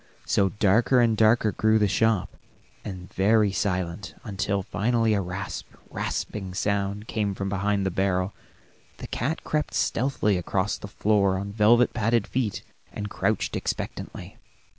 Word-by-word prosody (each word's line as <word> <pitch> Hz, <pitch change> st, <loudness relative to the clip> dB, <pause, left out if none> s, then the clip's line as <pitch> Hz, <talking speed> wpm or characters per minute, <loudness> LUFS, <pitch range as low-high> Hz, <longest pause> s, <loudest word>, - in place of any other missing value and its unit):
So 95 Hz, -1 st, +2 dB
darker 110 Hz, +6 st, +3 dB
and 115 Hz, -2 st, +4 dB
darker 110 Hz, 0 st, +4 dB
grew 110 Hz, +3 st, +3 dB
the 105 Hz, -1 st, +3 dB
shop, 105 Hz, +1 st, +1 dB, 0.5 s
and 90 Hz, -3 st, -8 dB
very 105 Hz, +1 st, +3 dB
silent, 95 Hz, -1 st, -2 dB
until 100 Hz, -1 st, -2 dB
finally 115 Hz, +2 st, +1 dB
a 100 Hz, -, +1 dB
rasp, 95 Hz, +2 st, -5 dB, 0.2 s
rasping 95 Hz, -3 st, -4 dB
sound 100 Hz, +1 st, -1 dB
came 105 Hz, -3 st, -1 dB
from 100 Hz, 0 st, -3 dB
behind 100 Hz, 0 st, 0 dB
the 95 Hz, -, 0 dB
barrel. 95 Hz, +1 st, 0 dB, 0.6 s
The -, -, -8 dB
cat 150 Hz, +7 st, -2 dB
crept 150 Hz, 0 st, -2 dB
stealthily 115 Hz, -6 st, +1 dB
across 95 Hz, +4 st, -1 dB
the -, -, -7 dB
floor 100 Hz, -1 st, +2 dB
on 100 Hz, +1 st, -4 dB
velvet 115 Hz, +4 st, +4 dB
padded 115 Hz, -1 st, +1 dB
feet, 120 Hz, -6 st, -2 dB, 0.3 s
and 105 Hz, -1 st, -5 dB
crouched -, -, -1 dB
expectantly. -, -, -5 dB
100 Hz, 140 wpm, -26 LUFS, 95-110 Hz, 0.6 s, and